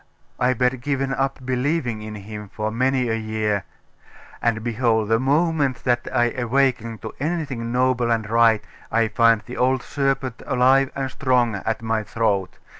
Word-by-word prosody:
I 125 +1 +3
bad 125 +1 +1
given 135 0 -1
up 135 -1 -2
believing 125 -2 -1
in 105 0 -7
him 105 0 -8
for 110 +1 -3
many 130 +2 +1
a 115 - 0
year.... 110 -3 -1 0.8
And 115 -2 0
behold, 115 -2 +1
the 115 0 +3
moment 145 -1 +1
that 120 -1 0
I 120 -2 +2
awaken 125 -2 0
to 110 - -6
anything 140 -7 -2
noble 125 -1 +1
and 115 -2 0
right, 115 -1 +4 0.3
I 115 0 +2
find 115 -1 +3
the 125 - -8
old 130 0 +2
serpent 135 -3 -1
alive 130 +1 +4
and 135 -1 -3
strong 125 -4 +1
at 110 +3 -3
my 110 -1 0
throat! 105 -4 -1
120 Hz, 160 wpm, -22 LUFS, 110-130 Hz, 0.8 s, right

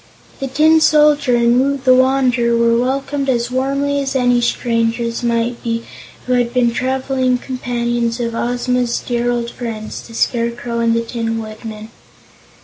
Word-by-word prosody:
The 270 - -3
Tin 310 +4 +4
Soldier 295 -4 +4
and 235 +1 +3
Woot 280 0 -1
the 255 - +6
Wanderer 255 -2 +2
were 230 0 +3
welcomed 270 +3 -1
as 240 -1 0
warmly 275 +2 0
as 270 -1 -3
any 245 -2 +3
strangers 230 0 -1
might 235 0 -1
be 230 -1 -2 0.4
who 255 - 0
had 245 -1 +1
been 245 -1 +3
the - - -5
traveling 260 0 0
companions 240 -2 -2
of 235 -1 -2
Ozma's 245 0 -1
dear 240 0 -2
old 240 -1 -2
friends, 220 -3 -6
the 230 - -12
Scarecrow 235 0 -1
and 230 0 +2
the 230 - +1
Tin 230 -1 -3
Woodman. 215 0 -8
245 Hz, 155 wpm, -17 LUFS, 235-260 Hz, 0.4 s, the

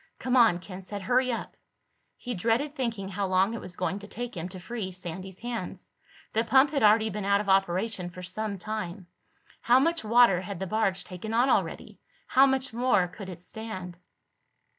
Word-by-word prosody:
"Come 255 0 -1
on," 230 -8 +6
Ken 185 +1 -9
said. 200 +1 -6
"Hurry 255 +5 +2
up." 230 - -4 0.6
He 245 - -5
dreaded 235 +9 0
thinking 230 -8 -3
how 195 +1 -2
long 190 +3 +2
it 230 - -5
was 180 - -8
going 190 +2 -2
to 205 - -11
take 245 +3 -6
him 175 +1 -4
to 185 0 -7
free 200 0 -5
Sandy's 185 +1 -7
hands. 240 0 -5 0.4
The 225 - +2
pump 265 +4 +4
had 280 -3 0
already 220 +1 +5
been 210 +1 -4
out 200 +1 +3
of 210 - -4
operation 190 0 +1
for 180 +1 -10
some 200 +3 -4
time. 185 -1 -5 0.6
How 245 +2 +5
much 330 +2 +1
water 220 -4 +5
had 190 -1 -6
the 190 - -2
barge 195 -1 0
taken 215 +5 -6
on 245 +3 +4
already? - - -1 0.3
How 270 +1 +5
much 265 -2 -1
more 235 -6 +2
could 190 +1 -9
it 175 -2 -9
stand? 185 -5 -7
210 Hz, 190 wpm, -28 LUFS, 185-235 Hz, 0.6 s, on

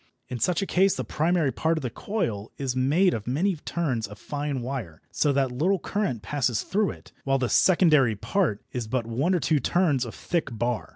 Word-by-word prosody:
In 125 -2 -4
such 175 - +1
a - - -1
case 190 +1 +3
the - - -3
primary 160 -2 +1
part 160 +4 0
of 155 - -4
the 125 - -3
coil 115 - -3
is 130 -2 -2
made 155 +9 +3
of 110 -1 -5
many 170 +10 +1
turns 140 -9 -2
of 105 +1 -11
fine 145 -1 -3
wire, 120 - -5
so 145 - +2
that 135 -2 +1
little 170 +11 +1
current 185 - -2
passes 125 -1 0
through 205 0 +1
it, - - -10
while 135 0 +2
the 125 -3 -1
secondary 155 - +4
part 155 - -1
is 120 -3 -4
but 120 0 -1
one 135 +11 0
or - - +2
two 155 -2 +2
turns 150 -2 +2
of 120 - -7
thick 155 -9 -2
bar. 120 -7 -1
140 Hz, 210 wpm, -26 LUFS, 120-170 Hz, -, secondary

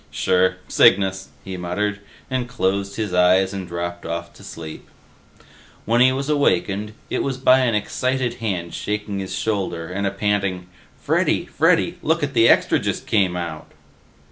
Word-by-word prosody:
"Sure, 90 0 +2
Cygnus," 95 0 +3 0.2
he 95 -1 -5
muttered, 100 +4 -2 0.3
and 130 -2 -2
closed 100 -4 -1
his 105 -5 -3
eyes 90 +2 +4
and 95 -2 -5
dropped 85 0 -5
off 85 +1 -5
to - - -16
sleep. 80 -1 -9 1.0
When 120 +2 +2
he 130 +1 +6
was 135 +1 -3
awakened, 105 -7 +1 0.2
it - - 0
was 135 -2 -2
by 130 0 +5
an 125 -4 +1
excited 130 +3 -1
hand 90 -6 -3
shaking 105 -1 -3
his 95 -1 -4
shoulder 95 -5 -2
and 100 +2 -2
a - - +2
panting, 100 -2 -1 0.3
"Freddy! - - +1
Freddy! - - +1
Lookit 150 -3 0
the 115 0 +5
Extra - - +4
just - - -3
came 95 -4 +1
out!" 85 -3 -6
100 Hz, 155 wpm, -21 LUFS, 90-115 Hz, 1.0 s, he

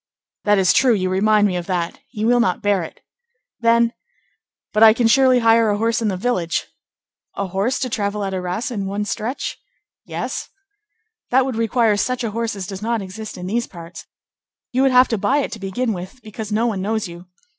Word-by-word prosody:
"That 205 0 +4
is 190 -2 +4
true; 245 -1 +4
you 185 -2 -1
remind 210 +2 +3
me 190 -3 0
of 175 -1 -4
that; 175 -3 -2
he 215 -4 -3
will 245 +1 +4
not 185 -6 +1
bear 205 -2 +2
it." 165 - -9 0.6
"Then—" 230 0 +3 0.8
"But 215 - +1
I 220 -1 +9
can 235 +1 0
surely 255 +1 +5
hire 225 -1 +4
a 205 - +1
horse 230 +2 0
in 225 - 0
the 190 -3 -1
village?" 180 -6 -1 0.7
"A 200 - -2
horse 195 +7 -1
to 260 - -2
travel 210 -4 -2
to 190 - -3
Arras 185 +8 -3
at 225 - -3
one 200 +1 -2
stretch?" 220 +6 -4 0.4
"Yes." - - -5 0.8
"That 260 +1 +4
would 260 -3 -3
require 225 -1 +2
such 255 +4 -1
a 225 - -2
horse 230 0 -2
as 195 -2 -5
does 195 0 -7
not 230 -1 -1
exist 215 +3 -8
in 180 - -6
these 235 +5 -1
parts. 170 -1 -11 0.6
You 255 - +1
would 270 - +4
have 255 0 +6
to 225 - -1
buy 275 - +2
it 290 - -1
to 225 - -7
begin 215 +5 -2
with, 185 +6 -8
because 215 0 -7
no 220 +3 +1
one 210 -5 -1
knows 215 +1 -1
you. 175 +1 -11
215 Hz, 210 wpm, -20 LUFS, 195-235 Hz, 0.8 s, I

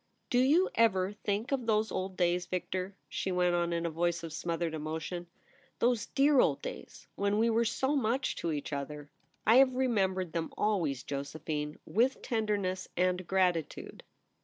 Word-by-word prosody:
* - - -46
Do 245 - +4
you 305 +9 +4
ever 195 -4 +3
think 210 +3 -2
of 255 -4 -1
those 215 0 +2
old 185 0 -3
days, 175 0 +1
Victor 185 +1 -3
?' - - -46
she 190 - -3
went 180 -1 +2
on, 175 0 +1
in 170 0 -1
a 170 - -1
voice 170 +1 0
of 165 -2 -6
smothered 165 0 -2
emotion; 160 +3 -4 0.3
' - - -32
those 240 -3 +1
dear 280 0 +4
old - - +2
days - - -8
when 200 +1 0
we 230 +1 +3
were 230 +1 +2
so 265 +5 0
much 260 0 0
to 170 - -2
each 145 -1 -4
other 145 +1 -5
!' - - -40
* - - -45
I 225 +4 +6
have 260 -1 +5
remembered 190 -9 +1
them 165 -1 -2
always, 165 -11 0
Jose 140 +2 -4
phine, 150 -1 -3
with 250 +5 +1
tenderness 205 -5 -1
and 180 0 +1
gratitude.' 180 -5 0
185 Hz, 190 wpm, -31 LUFS, 170-225 Hz, 0.3 s, I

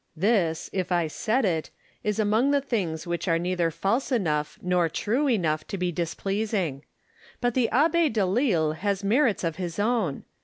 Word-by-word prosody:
This, 170 -3 +1
if 185 -1 -2
I 175 -2 +2
said 220 - 0
it, 165 -4 -1 0.3
is 210 -1 -1
among 220 +5 +2
the 285 0 +3
things 190 - -2
which 175 +2 -3
are 165 -1 +3
neither 175 0 0
false 205 - -1
enough 155 - 0
nor 180 -2 +1
true 245 - 0
enough 155 -9 0
to 195 - -4
be 180 -1 -1
displeasing. 180 - -2 0.6
But 245 -1 0
the 245 -2 +2
Abb6 320 +3 +3
Delille 195 - +2
has 200 +1 -1
merits 225 +1 +2
of 165 -2 -2
his 175 -3 -4
own. 210 - 0
195 Hz, 165 wpm, -26 LUFS, 170-230 Hz, 0.6 s, the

